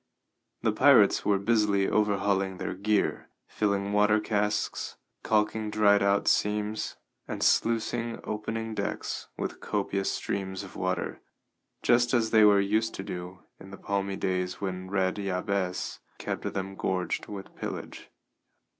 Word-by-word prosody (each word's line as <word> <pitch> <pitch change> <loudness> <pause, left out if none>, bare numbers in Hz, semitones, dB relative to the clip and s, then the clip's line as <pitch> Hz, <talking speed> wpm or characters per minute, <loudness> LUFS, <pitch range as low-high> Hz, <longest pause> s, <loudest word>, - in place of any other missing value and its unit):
The - - +3
pirates - - +5
were 100 -1 +3
busily 100 -2 +2
overhauling 100 -2 +1
their - - -3
gear, 100 +2 0 0.2
filling 100 -1 -1
water 105 +1 +4
casks, 105 -1 -1 0.2
calking 110 0 +1
dried 105 -1 +4
out 100 0 +2
seams, 105 +1 0 0.3
and - - -3
sluicing 115 0 +1
opening 110 +1 -3
decks 100 -1 -3
with - - -4
copious 100 -1 -1
streams 95 -1 -3
of 95 - -11
water, 90 -1 -2 0.6
just 120 +1 +4
as 115 -2 +1
they 110 -1 +6
were 105 -1 +7
used 110 +3 +1
to 95 - -5
do 90 0 -7 0.2
in 95 - -12
the 100 - -9
palmy 100 -1 -2
days 90 -1 -2
when 95 -1 -4
Red 95 -1 0
Jabez 95 -1 -2 0.2
kept - - -3
them 95 0 -4
gorged 90 -2 -2
with 100 -2 -8
pillage. - - -6
100 Hz, 135 wpm, -28 LUFS, 95-105 Hz, 0.6 s, were